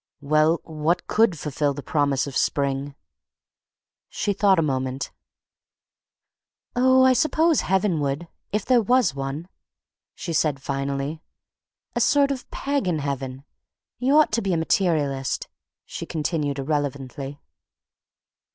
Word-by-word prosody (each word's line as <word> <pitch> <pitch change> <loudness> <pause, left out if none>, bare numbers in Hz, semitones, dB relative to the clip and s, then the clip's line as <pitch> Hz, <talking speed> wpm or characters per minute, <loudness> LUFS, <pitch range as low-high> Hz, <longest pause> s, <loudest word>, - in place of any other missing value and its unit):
"Well, 155 +3 +3
what 160 +2 -1
could 215 -6 +2
fulfil 145 -1 -1
the 145 - -7
promise 145 -4 +1
of 140 -3 -7
spring?" 140 0 0 1.1
She 205 - -1
thought 195 -1 +4
a 165 - +3
moment. 130 -2 -2 1.6
"Oh, 260 +1 +5
I 260 - +6
suppose 310 +4 +3
heaven 190 -3 +1
would, 145 +4 -2 0.2
if 210 -1 -1
there 250 -2 +4
was 245 - +3
one," 135 +4 -4 0.7
she 170 - -5
said 150 -3 +1
finally, 140 +3 -3 0.7
"a - - +1
sort 280 -1 +4
of 260 -2 -5
pagan 275 - -1
heaven—you 140 - -3
ought 310 - +5
to 230 +1 +1
be 195 -3 0
a - - +1
materialist," 155 -6 0 0.4
she - - -7
continued 150 -3 -2
irrelevantly. 140 -1 -3
155 Hz, 120 wpm, -24 LUFS, 140-205 Hz, 1.6 s, I